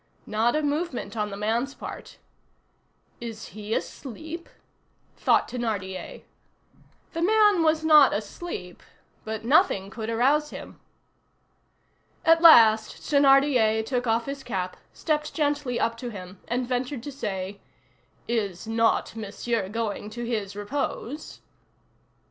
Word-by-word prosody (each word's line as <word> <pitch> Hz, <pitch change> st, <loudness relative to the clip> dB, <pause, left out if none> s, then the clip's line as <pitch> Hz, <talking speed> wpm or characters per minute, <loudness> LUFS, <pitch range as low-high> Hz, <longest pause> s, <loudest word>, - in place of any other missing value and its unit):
Not 225 Hz, +4 st, +1 dB
a 305 Hz, -, 0 dB
movement 295 Hz, -4 st, -2 dB
on 210 Hz, -1 st, -1 dB
the 200 Hz, -, -7 dB
man's 230 Hz, +6 st, -1 dB
part. -, -, -9 dB, 1.0 s
"Is 230 Hz, -2 st, -7 dB
he 215 Hz, +1 st, -4 dB
asleep?" 320 Hz, +6 st, -6 dB, 0.7 s
thought -, -, +2 dB
Thénardier. 205 Hz, -6 st, -4 dB, 0.9 s
The 330 Hz, -, -3 dB
man 415 Hz, 0 st, +4 dB
was 315 Hz, 0 st, +2 dB
not 300 Hz, -3 st, +7 dB
asleep, 205 Hz, -, -6 dB, 0.4 s
but 220 Hz, 0 st, -5 dB
nothing 240 Hz, -, +3 dB
could 220 Hz, +1 st, -5 dB
arouse 275 Hz, +6 st, +2 dB
him. -, -, -10 dB, 1.5 s
At 330 Hz, 0 st, +6 dB
last 225 Hz, -10 st, +7 dB
Thénardier 270 Hz, -6 st, +4 dB
took 250 Hz, 0 st, -1 dB
off 230 Hz, +1 st, +1 dB
his 275 Hz, 0 st, -6 dB
cap, 185 Hz, -5 st, -3 dB, 0.2 s
stepped 300 Hz, -1 st, -2 dB
gently 290 Hz, -5 st, 0 dB
up 230 Hz, 0 st, 0 dB
to 245 Hz, +1 st, -5 dB
him, 185 Hz, -3 st, -9 dB
and 250 Hz, +1 st, -1 dB
ventured 250 Hz, 0 st, -2 dB
to 290 Hz, -, -6 dB
say:— 195 Hz, -6 st, -4 dB, 0.7 s
"Is 205 Hz, -6 st, -2 dB
not 225 Hz, 0 st, +1 dB
Monsieur 215 Hz, -1 st, -3 dB
going 210 Hz, -1 st, -3 dB
to 240 Hz, +2 st, -6 dB
his 210 Hz, -4 st, -3 dB
repose?" 275 Hz, +5 st, -4 dB
235 Hz, 120 wpm, -26 LUFS, 215-290 Hz, 1.5 s, not